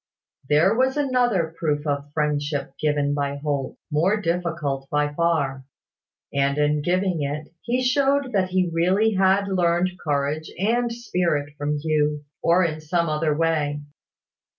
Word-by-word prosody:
There 155 +7 +4
was 260 +4 +1
another 245 - +1
proof 150 -2 -1
of 145 -1 -2
friendship 145 -2 -1
given 145 -1 +1
by 140 -1 -1
Holt, 140 -2 -3
more 180 +8 +2
difficult 165 -7 -2
by 145 0 0
far; 145 -5 0 0.7
and 140 0 +1
in 150 0 +2
giving 180 +1 0
it, 150 +3 -4
he 250 +2 -1
showed 275 +1 +2
that 190 -3 +1
he 185 -2 +1
really 190 +6 +2
had 195 +1 +3
learned 180 -1 +1
courage 150 +1 -1
and 235 +5 +1
spirit 175 -11 -1
from 150 0 -2
Hugh, 150 -1 0 0.2
or 175 +2 +4
in 155 -2 -3
some 170 +1 0
other 155 -1 0
way. 155 -3 0
160 Hz, 140 wpm, -23 LUFS, 145-185 Hz, 0.7 s, There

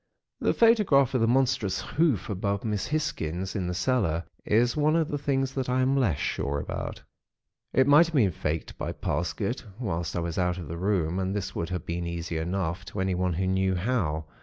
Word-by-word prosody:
"The - - +1
photograph 205 - +4
of 130 - +2
the 115 - +3
monstrous 120 -6 +1
hoof 150 - +1
above 100 0 -2
Miss 105 -3 -1
Hisgins 95 - -2
in 95 -3 -1
the 90 - -2
cellar, 90 -4 +1 0.2
is 120 +3 +2
one 155 +1 +3
of 165 -2 +1
the 145 - -1
things 135 -1 0
that 130 -2 -2
I 130 +1 +2
am 130 +1 +2
less 110 - +2
sure 70 0 -1
about. - - -5 0.7
It 130 - +4
might 145 +4 +7
have 165 - -5
been 110 -9 +4
faked 75 0 -4
by - - -3
Parsket, - - -2
whilst 85 - -3
I - - 0
was 85 +1 -2
out 90 0 +1
of 85 -4 -6
the 85 - -4
room, 90 -3 0
and 95 +1 -1
this 100 -2 -3
would 85 0 -3
have 90 -1 -4
been 85 0 -3
easy 85 -1 -3
enough, 85 0 -2
to 105 - -6
anyone 90 -1 0
who 95 +3 -1
knew 95 0 +1
how. 90 -7 -1
95 Hz, 205 wpm, -27 LUFS, 85-130 Hz, 0.7 s, might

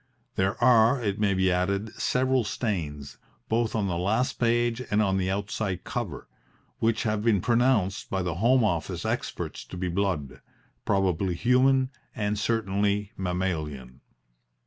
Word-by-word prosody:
There 95 +1 0
are, 120 +1 +5
it 105 -4 -2
may 100 -2 +2
be 95 0 +2
added, 100 +4 -1
several 130 0 +1
stains, 75 - -3 0.3
both 115 0 0
on 105 -2 +1
the 85 -3 -1
last 110 +8 0
page 120 0 +1
and 105 - +2
on 95 -3 +2
the 95 -1 0
outside 100 -1 -2
cover, - - -5 0.5
which 115 -1 +1
have 110 -2 0
been 110 -3 +3
pronounced 115 -3 +1
by 95 -1 -1
the 90 -2 -1
Home 125 +2 +4
Office 85 -7 -1
experts - - -3
to - - -9
be 90 0 -2
blood 90 -6 -2 0.4
probably 95 -2 +1
human 130 +5 +3 0.2
and 105 -3 -1
certainly 105 -2 0
mammalian. 80 -9 -3
100 Hz, 145 wpm, -27 LUFS, 90-115 Hz, 0.5 s, are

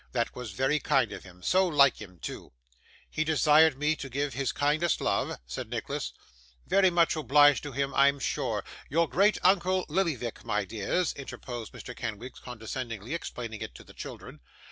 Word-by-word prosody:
That 120 -2 -1
was 125 -5 -6
very 135 +6 +1
kind 130 -4 +2
of - - -7
him; 90 -1 -15
so 185 - +3
like 140 -7 +4
him 90 -4 -11
too! 80 - -8 0.5
'He 155 - -1
desired 155 -1 +5
me 150 +2 +1
to 135 - -6
give 140 +1 -2
his 135 +1 -1
kindest 155 +4 +1
love,' - - 0
said 60 +1 -6
Nicholas. - - -3 0.5
'Very 195 -1 +4
much 170 -2 +3
obliged 145 -1 +5
to 145 - -6
him, 140 +1 -2
I'm 140 +1 +4
sure. - - -2 0.3
Your 165 +3 +2
great 200 +7 +3
uncle, 185 0 +3
Lillyvick, 150 - -1
my 105 -1 -1
dears!' 115 - -1
interposed 120 -4 -7
Mr. - - -9
Kenwigs, 115 +4 -6
condescendingly 115 0 -6
explaining 115 -9 -5
it - - -6
to - - -11
the - - -16
children. 75 - -9
140 Hz, 170 wpm, -29 LUFS, 120-160 Hz, 0.5 s, desired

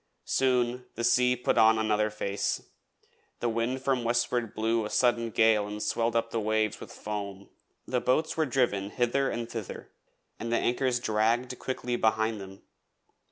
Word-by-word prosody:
Soon 125 -1 +1
the 120 - -4
sea 125 +1 +4
put 125 - +1
on 110 0 +6
another 110 -1 +1
face, 100 -2 -3 0.7
the 120 - -1
wind 115 +3 -1
from 130 -3 +1
westward 120 -1 0
blew 115 +1 +1
a 105 - -4
sudden 120 -1 +2
gale 110 -2 +3
and 105 0 -5
swelled 115 +2 0
up 115 0 0
the 115 - -1
waves 110 0 0
with - - -10
foam. 100 -2 -6 0.4
The 125 -1 -1
boats 155 +5 +1
were 160 -2 +1
driven 115 -6 0
hither 125 +4 +1
and 115 -1 -3
thither, 115 -4 -7 0.5
and 115 +1 -4
the 120 - +3
anchors 125 0 +1
dragged 120 +3 0
quickly 125 -2 -3
behind 110 -1 +1
them. 95 0 -11
115 Hz, 160 wpm, -28 LUFS, 110-125 Hz, 0.7 s, on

